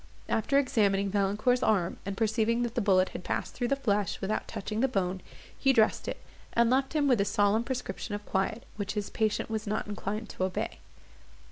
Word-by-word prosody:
After 275 +5 +1
examining 200 -7 +2
Valancourt's 210 +5 +2
arm, 190 -6 +1
and 195 -1 -3
perceiving 225 +1 +1
that 235 -1 -2
the 240 - 0
bullet 190 -3 +4
had - - -7
passed - - -2
through 245 - -1
the 275 - +2
flesh 210 -8 0
without 210 +3 -2
touching 215 +2 -4
the 265 - +3
bone, 190 -6 -1 0.3
he 270 - +3
dressed 220 -3 +3
it, - - -3 0.3
and 235 0 +4
left 265 +2 +2
him 295 -2 +2
with 245 -6 +4
a - - +2
solemn 205 +2 +2
prescription 235 -5 -4
of 205 - -7
quiet, 200 +4 -1
which 205 0 -3
his 210 -2 -3
patient 220 0 0
was 220 0 -3
not 215 +2 -1
inclined 210 +1 -4
to - - -3
obey. 185 -1 -2
215 Hz, 200 wpm, -29 LUFS, 200-235 Hz, 0.3 s, bullet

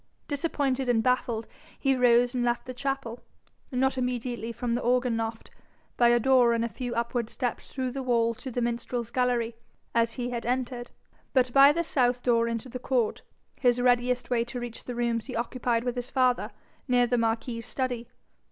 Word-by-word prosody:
Disappointed 275 -3 -1
and 225 -2 +3
baffled, 240 -2 +1 0.3
he 270 -1 +2
rose 245 0 +4
and 250 -1 0
left 240 0 0
the 255 - -6
chapel, 270 -2 -3 0.5
not 265 +1 +1
immediately 245 -2 -2
from 235 +1 -2
the 240 - 0
organ 245 0 +2
loft, 225 0 -4 0.4
by 240 - +4
a 240 0 +5
door 250 -1 +4
and 230 0 +1
a - - -3
few 245 0 -5
upward 235 0 -1
steps 245 -1 -3
through 260 -2 -2
the 270 +2 -4
wall 235 -2 +2
to 260 +4 -8
the 245 -1 -2
minstrels' 235 0 -2
gallery, 245 -2 +1 0.4
as 230 0 +2
he 245 -1 -3
had 235 -2 -3
entered, 245 0 -2 0.4
but 255 -2 +3
by 275 +1 +8
the 335 +3 0
south 250 -5 +1
door 230 -2 +3
into 230 +1 -3
the 250 0 -6
court, 245 -3 0 0.4
his 245 -1 +3
readiest 245 0 +2
way 235 -1 +3
to 245 +1 -6
reach 240 -1 -7
the 245 - -5
rooms 235 -1 -1
he 260 - -5
occupied 235 0 -1
with 245 -1 -1
his 245 0 -4
father, 255 -2 +2 0.4
near 245 -1 +4
the 245 0 +1
marquis's 230 0 -1
study. 245 -3 -2
245 Hz, 190 wpm, -27 LUFS, 235-255 Hz, 0.5 s, by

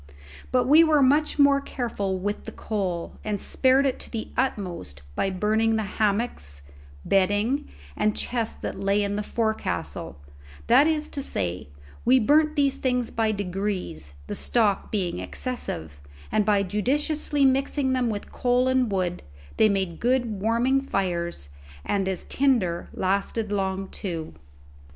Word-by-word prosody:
But 250 -1 +3
we 305 +5 +7
were 305 -3 +4
much 295 +4 +3
more 280 -1 +5
careful 215 -8 -3
with 205 +3 -3
the - - -6
coal, 185 -6 -3
and 210 -2 -2
spared 265 +5 +3
it 265 - 0
to - - -5
the 225 -2 -5
utmost 175 - -3
by 195 - 0
burning 215 +4 +1
the 220 - 0
hammocks, 200 - -1 0.4
bedding, 205 +8 +1 0.3
and 215 0 +1
chests 235 -2 -2
that - - -4
lay 200 +1 +2
in 200 0 -1
the 210 - -1
forecastle; 90 - -2 0.5
that 290 - +6
is 310 -1 0
to 280 - -4
say, 90 - -2 0.3
we 255 +2 +5
burnt 305 +6 +3
these 280 -3 +2
things 250 -2 0
by 225 -1 +1
degrees, 190 - -3
the - - -5
stock 215 -5 +1
being 185 - -1
excessive, 85 - -5 0.3
and 215 -1 +2
by 205 -1 +3
judiciously 285 - 0
mixing 270 0 +2
them 250 -2 +1
with 205 -2 -5
coal 250 0 +2
and 260 -3 +2
wood, 180 -2 -1 0.4
they 220 - +5
made 190 -4 -1
good 240 -5 0
warming 240 +5 +2
fires, 175 - -2 0.4
and 195 -2 0
as 190 - -3
tinder 230 -11 +1
lasted 200 +3 -1
long 195 -1 -1
too. 165 - -5
210 Hz, 145 wpm, -25 LUFS, 190-255 Hz, 0.5 s, we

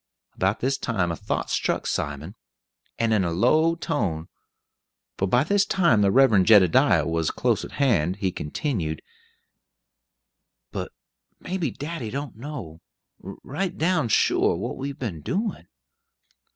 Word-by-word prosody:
About 95 +3 0
this 135 +2 0
time 95 -8 -1
a - - -2
thought - - -3
struck - - -1
Simon, 75 +5 -3 0.6
and 115 -1 +1
in 105 -3 +2
a 85 - 0
low 155 - +3
tone 100 - -2 0.9
for 95 - -1
by 120 +7 +3
this 200 +5 +2
time 170 - +3
the 100 - +4
Reverend 105 -5 +4
Jedediah 100 -6 +5
was 80 -1 0
close - - 0
at - - -9
hand 95 - +1
he 95 -2 -1
continued, 80 - -3 1.7
"But - - -5 0.5
may 185 +1 -4
be 160 -6 0
daddy 145 -2 -6
don't 140 +2 -5
know, 115 - -8 0.4
right 150 - -5
down 170 -5 +1
sure, 110 - +2
what - - -4
we've 140 0 -5
been 95 - -5
doin'. 205 - -3
115 Hz, 140 wpm, -24 LUFS, 90-145 Hz, 1.7 s, Jedediah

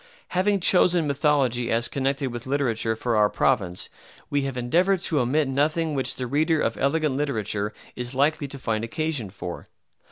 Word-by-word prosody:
Having 195 +2 +1
chosen 180 -2 +4
mythology 140 -4 +1
as 115 +1 +2
connected 135 -1 -1
with 120 +1 -7
literature 115 -5 0
for 115 +1 -1
our 105 -1 +4
province, 90 -3 0 0.4
we 145 0 +1
have 135 -2 -4
endeavored 175 +10 +1
to 155 -6 +2
omit 140 +4 +1
nothing 155 +4 0
which 135 -2 +1
the 125 - -3
reader 155 +5 +1
of - - 0
elegant 150 0 +1
literature 110 -7 -2 0.2
is 125 +1 -5
likely 145 +2 +1
to 140 - -9
find 110 -4 -2
occasion 150 - -3
for. 90 -2 -8
135 Hz, 165 wpm, -24 LUFS, 120-155 Hz, 0.4 s, chosen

